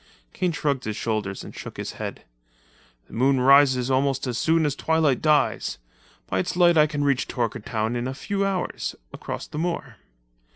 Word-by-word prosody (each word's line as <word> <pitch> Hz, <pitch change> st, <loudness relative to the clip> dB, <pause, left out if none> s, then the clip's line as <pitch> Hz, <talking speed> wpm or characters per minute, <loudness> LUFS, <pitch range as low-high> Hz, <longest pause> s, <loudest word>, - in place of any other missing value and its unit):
Kane 180 Hz, -1 st, 0 dB
shrugged 145 Hz, -4 st, -1 dB
his 105 Hz, -1 st, -3 dB
shoulders 105 Hz, -4 st, -3 dB
and -, -, -10 dB
shook -, -, -8 dB
his -, -, -4 dB
head. -, -, -6 dB, 0.8 s
"The -, -, -18 dB
moon 130 Hz, +3 st, +3 dB
rises 130 Hz, -1 st, +5 dB
almost 135 Hz, +1 st, +1 dB
as 125 Hz, -2 st, -2 dB
soon 160 Hz, +5 st, +2 dB
as 145 Hz, -2 st, 0 dB
twilight 160 Hz, -5 st, +1 dB
dies. 150 Hz, -1 st, +2 dB, 0.5 s
By 95 Hz, -, -1 dB
its 175 Hz, -, -2 dB
light 175 Hz, -1 st, +5 dB
I 155 Hz, -1 st, +6 dB
can 145 Hz, -1 st, -2 dB
reach 140 Hz, -3 st, +1 dB
Torkertown 115 Hz, -1 st, -2 dB
in 120 Hz, +1 st, -2 dB
a 130 Hz, -, -4 dB
few 200 Hz, +6 st, -2 dB
hours, 195 Hz, -2 st, -2 dB, 0.2 s
across -, -, -6 dB
the 150 Hz, -, -6 dB
moor." 175 Hz, +1 st, -3 dB
140 Hz, 175 wpm, -24 LUFS, 125-160 Hz, 0.8 s, I